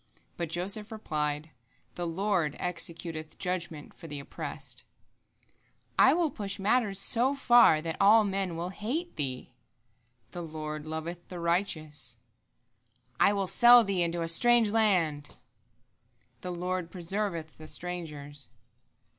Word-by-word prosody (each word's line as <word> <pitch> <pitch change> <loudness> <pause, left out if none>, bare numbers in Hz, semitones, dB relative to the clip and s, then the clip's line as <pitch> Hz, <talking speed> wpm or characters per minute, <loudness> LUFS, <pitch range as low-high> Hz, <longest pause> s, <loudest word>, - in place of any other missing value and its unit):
But 170 -2 -4
Joseph 195 +6 -1
replied, 150 -7 -3 0.4
"The 175 -1 -4
Lord 170 -3 0
executeth 165 -2 -3
judgment 175 -5 -4
for 165 - -11
the 145 -2 -6
oppressed." 140 - -7
Zuleika: - - -26 0.4
"I - - +7
will 335 -3 +1
push 200 -2 -4
matters 205 0 +1
so 245 +7 +3
far 240 - +5
that 165 -1 -4
all 215 +3 +7
men 195 -3 -2
will 170 +2 -3
hate 255 - -4
thee." 130 -3 -4
Joseph: 120 0 -40
"The 175 - -6
Lord 155 -2 -6
loveth 165 +2 -6
the 180 - -7
righteous." 160 - -1
Zuleika: 120 +1 -43
"I - - +1
will 200 -1 0
sell 240 +5 +7
thee 195 -3 -1
into 170 0 -1
a - - -2
strange 235 +5 +4
land." 180 -10 +2
Joseph: - - -20 1.0
"The 180 -1 -5
Lord 180 0 -3
preserveth 175 -3 -3
the 155 - -10
strangers." 150 -4 -7
170 Hz, 140 wpm, -29 LUFS, 150-200 Hz, 1.0 s, I